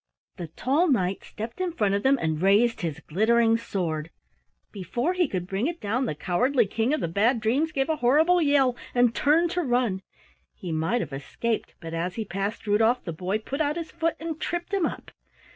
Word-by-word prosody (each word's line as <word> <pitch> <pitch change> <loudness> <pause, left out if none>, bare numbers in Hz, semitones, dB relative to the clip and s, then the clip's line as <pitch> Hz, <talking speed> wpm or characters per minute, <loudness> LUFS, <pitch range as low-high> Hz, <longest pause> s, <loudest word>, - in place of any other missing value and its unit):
The 175 - -5
tall 275 - +1
knight 190 -8 +1
stepped 230 +9 -7
in 360 -2 -1
front 210 -10 +1
of 200 - +1
them 270 +4 +3
and 160 -3 -1
raised 210 +5 +3
his 160 -2 -3
glittering 225 +7 +3
sword. 170 -9 -3 0.6
Before 235 - -2
he 360 -3 +2
could 185 -7 -3
bring 195 +7 -1
it 340 0 -4
down, 235 +5 -1
the 150 - -3
cowardly 240 - +1
King 225 +5 -1
of 305 - 0
the - - 0
Bad 220 +8 +2
Dreams 265 +9 +1
gave 270 -2 0
a 315 -1 0
horrible 315 +9 +4
yell 280 -4 +3 0.2
and 245 -1 +4
turned 325 +6 +3
to 360 - 0
run. 245 - 0 0.5
He 180 - -6
might 160 +10 0
have 150 - -6
escaped, 215 +11 -3
but 165 0 -8
as 175 +2 -2
he 225 - -3
passed 200 +4 -4
Rudolf 225 +4 +2
the 170 - -5
boy 185 +5 -2
put 270 +7 -4
out 295 +1 0
his 330 -1 -5
foot 330 0 -1
and 320 -1 -5
tripped 345 +3 -3
him 385 -4 +2
up. - - -8
230 Hz, 205 wpm, -26 LUFS, 190-285 Hz, 0.6 s, horrible